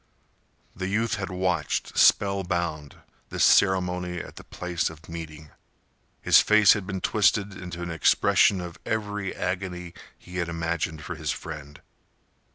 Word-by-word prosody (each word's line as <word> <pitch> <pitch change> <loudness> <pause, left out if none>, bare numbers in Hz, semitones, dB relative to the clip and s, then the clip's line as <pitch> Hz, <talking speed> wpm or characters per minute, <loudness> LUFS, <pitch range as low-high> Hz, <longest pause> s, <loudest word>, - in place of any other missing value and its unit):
The 95 0 -4
youth 110 +2 0
had 95 -2 -4
watched, 90 -1 -1
spellbound, 85 -7 +2 0.3
this - - 0
ceremony 90 -2 +3
at - - -8
the - - -11
place 90 -2 -3
of 80 0 -14
meeting. 80 -2 -9 0.7
His - - +7
face 105 -2 +6
had 100 -3 -5
been 95 -2 -4
twisted 105 -1 +2
into 85 -2 -7
an 85 - -4
expression 90 +3 +3
of 85 -1 -8
every 105 -3 -3
agony 90 -2 -4 0.2
he 90 +1 -10
had 85 -2 -1
imagined 85 -1 -3
for - - -5
his - - -5
friend. 75 -1 -6
90 Hz, 140 wpm, -26 LUFS, 85-95 Hz, 0.7 s, His